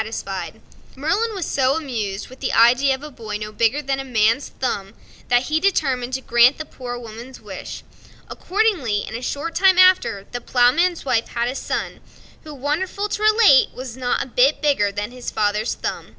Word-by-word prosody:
Merlin 415 - -1
was 370 -5 -3
so 265 0 +1
much 325 - -3
amused 215 -7 -4
with 255 - -14
the - - -2
idea 255 +4 +4
of 265 - -13
a 300 - -8
boy 220 -5 -6
no 210 0 -7
bigger 230 +7 +1
than 270 0 -1
a - - -3
man's 230 0 +1
thumb 205 -5 -4 0.3
that 245 0 +3
he 310 +3 0
determined 265 -9 0
to 265 - -4
grant 240 +2 +4
the 310 - -6
Poor 245 -4 -7
Woman's 235 +2 -10
wish. - - -8 0.4
Accordingly, 360 - 0
in - - -8
a 235 - -5
short 290 +6 -4
time 380 0 +4
after, 370 - +4
the 245 - -5
Ploughman's 275 +10 +2
wife 230 -4 +1
had 235 0 -2
a - - -3
son, - - -4 0.4
who, 310 - -10
wonderful 335 +9 -2
to 415 - -3
relate! 430 -10 +5
was 255 -2 -7
not 250 -1 -1
a - - -10
bit 260 +4 +3
bigger 275 -9 +1
than 205 +3 -4
his 250 -1 -6
father's 210 +1 -1
thumb. - - -5
260 Hz, 190 wpm, -21 LUFS, 235-305 Hz, 0.4 s, relate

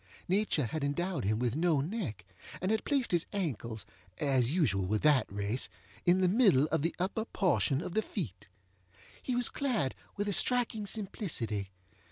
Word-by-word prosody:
Nature 190 - +2
had 155 +5 -3
endowed 175 - -1
him 105 +2 +1
with 120 +1 0
no 160 -2 +2
neck, 145 - -4 0.3
and 185 +3 0
had 220 - +1
placed 275 -4 +1
his 175 -2 +1
ankles 120 - -3 0.3
(as 130 -4 +2
usual 105 - +1
with 105 +2 0
that 145 -8 +4
race) 100 +5 -1 0.4
in 180 +2 +5
the 185 - +4
middle 185 - +5
of - - +1
the 165 +3 -1
upper 190 +5 -1
portion 170 -8 +1
of 175 - -5
the 220 - +2
feet. 120 - -5 0.7
He 255 - -2
was 245 -1 +4
clad 235 - -1 0.2
with 205 0 -1
a 205 - +1
striking 230 -2 +2
simplicity. 155 - -2
165 Hz, 170 wpm, -31 LUFS, 125-205 Hz, 0.7 s, in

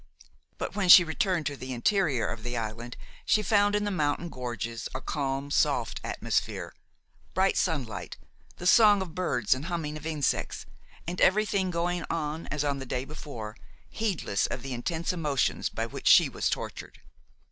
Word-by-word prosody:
But - - -4
when 200 -3 0
she 175 - +11
returned 175 0 0
to 145 - -2
the 130 -1 -6
interior 145 - +1
of 115 - -5
the 120 +1 -4
island 115 +2 -5 0.3
she 215 - +2
found 205 0 +3
in 210 - +1
the 205 - -1
mountain 160 -1 -1
gorges 115 -3 -5
a - - -1
calm, 140 0 -3
soft - - +1
atmosphere, - - -2 0.6
bright 190 +2 +3
sunlight, 125 - -2 0.4
the 180 - -8
song 205 0 +6
of 170 -4 -10
birds 170 - +1
and 130 +4 -5
humming 165 -4 -3
of 155 +1 -7
insects, 150 -4 -1 0.4
and 175 +2 -4
everything 200 -1 +3
going 175 0 -1
on 155 0 -3
as 150 0 -2
on 140 -1 -1
the 135 - -7
day 125 +1 -2
before, 130 -8 -8 0.4
heedless 190 - -1
of 130 - -5
the 135 -1 -4
intense 165 +8 -2
emotions 150 -6 0
by - - -3
which - - -6
she - - +7
was - - -1
tortured. - - -5
155 Hz, 170 wpm, -28 LUFS, 130-180 Hz, 0.6 s, she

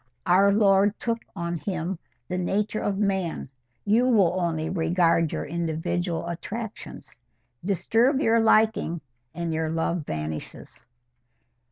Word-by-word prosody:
Our 195 +3 +5
Lord 200 0 +4
took 230 -1 -1 0.2
on 170 0 -3
Him 180 -1 -3 0.3
the 180 0 -2
nature 205 +4 -1
of 200 -1 -1
man: 190 -8 -1 0.4
you 225 +5 +3
will 205 -9 +4
only 160 -2 -1
regard 165 -1 +2
your - - -3
individual 170 +1 -2
attractions. 210 +6 -7 0.4
Disturb 225 - +2
your 230 -5 +3
liking 220 -6 +3 0.3
and 170 -1 -2
your 160 0 -1
love 165 +1 -1
vanishes." 75 0 -6
180 Hz, 120 wpm, -25 LUFS, 165-210 Hz, 0.4 s, Our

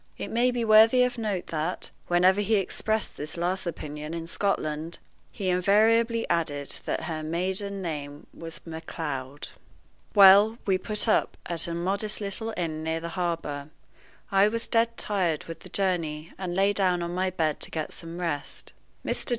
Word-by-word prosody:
It - - -5
may 240 +2 +3
be 245 -2 -1
worthy 225 +3 +7
of 250 -1 -1
note 205 -5 -2
that, 160 +3 -2 0.2
whenever 185 +3 +4
he 215 +2 +2
expressed 215 +2 -1
this 150 +3 -5
last 180 +2 -1
opinion 150 -1 -5
in 165 -1 -5
Scotland, 165 -3 -1 0.3
he 190 -2 -3
invariably 225 +5 +3
added 145 -5 -1
that - - -2
her 160 -1 -3
maiden 190 +5 -1
name 145 -3 -5
was 165 -1 -7
Macleod. 150 -4 -6 0.7
Well, 200 +3 +8
we 190 -2 +2
put 210 +3 0
up 215 - +2
at 170 -1 -2
a 170 - -3
modest 200 +5 -1
little 215 +2 -2
inn 160 -2 -3
near 160 0 -1
the 170 +1 -5
harbor. 165 -5 -3 0.6
I 195 +1 +5
was 230 +2 -2
dead 230 0 +1
tired 180 -7 0
with 165 -1 -8
the - - -12
journey, 165 -5 -1
and 180 -2 -4
lay 195 +2 +3
down 180 -3 +1
on 170 0 -4
my 185 +1 0
bed 160 -5 -1
to - - +1
get 155 -2 -4
some 165 0 -6
rest. 165 -5 -4 0.3
Mr. - - -1
180 Hz, 165 wpm, -27 LUFS, 160-205 Hz, 0.7 s, Well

